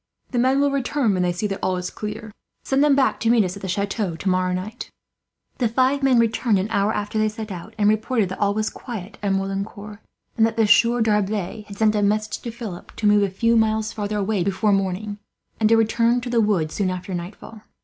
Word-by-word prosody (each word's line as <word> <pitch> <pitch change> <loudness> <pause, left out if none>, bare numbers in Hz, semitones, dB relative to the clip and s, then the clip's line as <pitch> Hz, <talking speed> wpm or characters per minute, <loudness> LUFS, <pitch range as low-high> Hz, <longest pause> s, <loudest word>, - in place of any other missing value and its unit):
The 245 - 0
men 260 +3 +3
will 285 0 +2
return 275 -4 0
when 185 - 0
they 180 0 +1
see 175 +4 -3
that 195 -2 -2
all 185 -1 0
is 180 0 -4
clear. 215 +1 -6 0.3
Send 270 +1 +2
them 295 -2 +4
back 270 -1 +2
to 225 - +1
meet 230 -2 +5
us 180 0 -3
at 200 - -10
the 190 - -5
chateau, 200 -1 -2
tomorrow 185 +1 0
night." 190 +6 -5 0.7
The 245 - +2
five 260 +5 +1
men 265 -2 +4
returned 230 -1 +2
an 195 +4 -2
hour 200 0 +2
after 210 0 -2
they 215 0 +2
set 215 -1 -7
out, 190 +5 -8
and 205 -1 +2
reported 215 -1 +1
that 185 - -6
all 200 0 +1
was 215 0 -1
quiet 210 -4 -8
at 200 -1 0
Merlincourt; 200 +2 -4 0.4
and 225 - +4
that 225 - -5
the 225 - +4
Sieur 235 +3 +4
D'Arblay 210 -1 0
had 200 -1 -10
sent 215 0 +3
a 210 - +1
message, 215 +1 0
to 235 - -6
Philip, 225 -6 -8
to 220 - -4
move 205 0 +5
a 200 - +1
few 230 +5 +1
miles 220 -1 +1
farther 210 0 -3
away 200 -2 0
before 200 +2 +1
morning, 195 +2 -2 0.4
and 215 -1 +3
to 225 - +5
return 230 +2 +2
to 245 0 -5
the 235 -2 +3
wood 185 -8 +1
soon 195 -3 -1
after 185 +1 -5
nightfall. 185 +5 -7
215 Hz, 230 wpm, -22 LUFS, 195-230 Hz, 0.7 s, meet